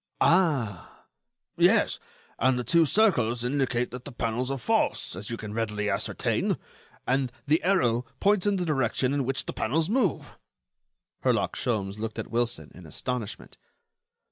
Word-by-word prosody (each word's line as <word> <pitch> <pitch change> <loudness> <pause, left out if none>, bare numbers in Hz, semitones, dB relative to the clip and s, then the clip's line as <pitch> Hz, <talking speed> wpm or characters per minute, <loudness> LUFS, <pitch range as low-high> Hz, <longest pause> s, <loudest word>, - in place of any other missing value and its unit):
"Ah!" 145 - +1 0.5
"Yes. - - +4 0.4
And 130 +1 +3
the 125 - -1
two 160 +7 +4
circles 125 - +2
indicate 125 -2 0
that 125 +1 -7
the 140 - -8
panels 120 +1 -2
are 135 - -1
false, 115 - 0
as 100 +5 -6
you 115 - -3
can 105 -1 -7
readily 105 -2 -1
ascertain, - - 0 0.5
and 130 0 +1
the 155 +3 +3
arrow 125 -11 +2
points 205 -1 +3
in 205 - +3
the 180 -2 -1
direction 130 -3 +1
in 140 -2 0
which 135 +1 -2
the - - -4
panels 155 - 0
move." 225 - 0 0.8
Herlock - - +1
Sholmes 105 -4 -2
looked 115 0 -4
at 110 - -5
Wilson, 115 -10 -1
in 90 -2 -12
astonishment. 120 +5 -5
125 Hz, 150 wpm, -27 LUFS, 115-145 Hz, 0.8 s, Yes